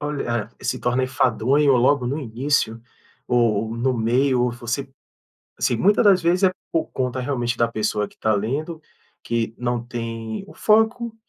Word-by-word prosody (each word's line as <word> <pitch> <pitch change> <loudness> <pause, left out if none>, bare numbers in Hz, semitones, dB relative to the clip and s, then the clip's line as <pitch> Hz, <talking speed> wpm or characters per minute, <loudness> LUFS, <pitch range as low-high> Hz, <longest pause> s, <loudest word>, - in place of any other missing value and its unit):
olha 130 -7 -2
ah, - - -21
e - - -13
se 125 +1 -1
torna 125 +1 0
enfadonho 130 +3 +2
logo 125 +1 +3
no 140 +4 -2
início 120 -2 -1 0.5
ou 115 -2 +1
no 125 +1 0
meio, 125 +3 +2
ou 125 -1 0
você 120 +3 -4 0.7
assim, 120 - +1
muita 205 - +4
das 195 -3 +5
vezes 175 +3 +1
é 185 - +5 0.2
por 165 - 0
conta, 130 0 -3
realmente, 120 -3 -1
da 115 - +3
pessoa 105 -2 -1
que - - -21
está 110 0 0
lendo, 150 +10 -2 0.4
que 115 -1 -2
não 120 -1 -1
tem 115 - -5
o - - -13
foco 225 +2 +2
125 Hz, 170 wpm, -22 LUFS, 115-145 Hz, 0.7 s, das